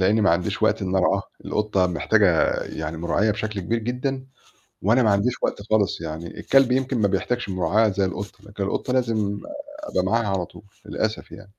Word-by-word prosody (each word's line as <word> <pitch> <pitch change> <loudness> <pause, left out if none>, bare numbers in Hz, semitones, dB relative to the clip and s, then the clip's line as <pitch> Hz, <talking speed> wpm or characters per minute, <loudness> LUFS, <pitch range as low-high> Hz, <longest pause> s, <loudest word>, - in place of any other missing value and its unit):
لإنّي 105 +4 +3
ما 100 - +4
عنديش 85 +1 0
وقت - - +2
إنّي 95 0 0
أرعاها، 95 +1 +2 0.2
القطّة 105 -3 +1
محتاجة 90 0 +3
يعني 80 +1 -5
مراعية 85 +6 +1
بشكل 105 -1 -3
كبير 115 +6 -1
جدًا، 125 +3 -3 0.6
وأنا 115 +6 +4
ما 110 - +4
عنديش 100 +5 +2
وقت - - 0
خالص 105 -4 +1
يعني 80 +1 -6
الكلب 135 -2 +4
يمكن 130 0 +1
ما 100 - +4
بيحتاجش 120 +2 -1
مراعية 95 +4 +2
زي 100 0 +1
القطّة، 100 +2 -6
لكن 100 -1 -5
القطّة 110 +5 -2
لازم 110 -5 0 0.4
أبقى 90 - -1
معاها 115 +3 +1
على 95 -3 0
طول - - -15 0.2
للأسف - - -3
يعني. - - -11
100 Hz, 180 wpm, -23 LUFS, 95-115 Hz, 0.6 s, ما